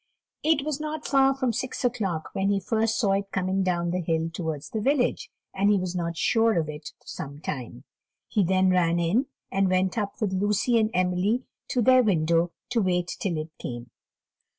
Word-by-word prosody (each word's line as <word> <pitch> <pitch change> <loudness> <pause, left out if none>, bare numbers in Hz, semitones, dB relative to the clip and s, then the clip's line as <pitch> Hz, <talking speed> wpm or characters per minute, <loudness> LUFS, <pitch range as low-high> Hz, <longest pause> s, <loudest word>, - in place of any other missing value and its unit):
It 305 -2 +2
was 305 -2 -2
not 305 0 -4
far 270 -1 +4
from 260 -3 0
six 255 +2 -3
o'clock 200 -10 -1
when 195 +1 0
he 200 -1 +2
first 220 +3 0
saw 205 -5 +2
it 195 0 -1
coming 190 0 0
down 175 -2 0
the 180 - -1
hill 165 0 -1
towards 160 -4 -4
the 220 - -2
village, 280 - +1 0.2
and 200 +1 +2
he 205 - +4
was 185 -1 -3
not 170 -1 -2
sure 225 0 +3
of 160 -2 +1
it 150 0 -7
for - - -31
some 140 +1 -7
time; 125 -4 -6 0.4
he 205 - +1
then 185 +1 +3
ran 170 -2 +3
in, 200 +11 +1 0.2
and 195 0 +2
went 185 +3 +1
up 200 -1 -4
with 210 -4 -1
Lucy 210 +5 +2
and 215 -1 +2
Emily 185 +7 +1 0.2
to 250 -3 0
their 255 +2 +6
window 170 -5 +2 0.2
to 235 -2 +2
wait 180 -2 0
till 175 -5 -1
it 155 +1 -5
came. 120 0 -6
190 Hz, 195 wpm, -26 LUFS, 170-230 Hz, 0.4 s, their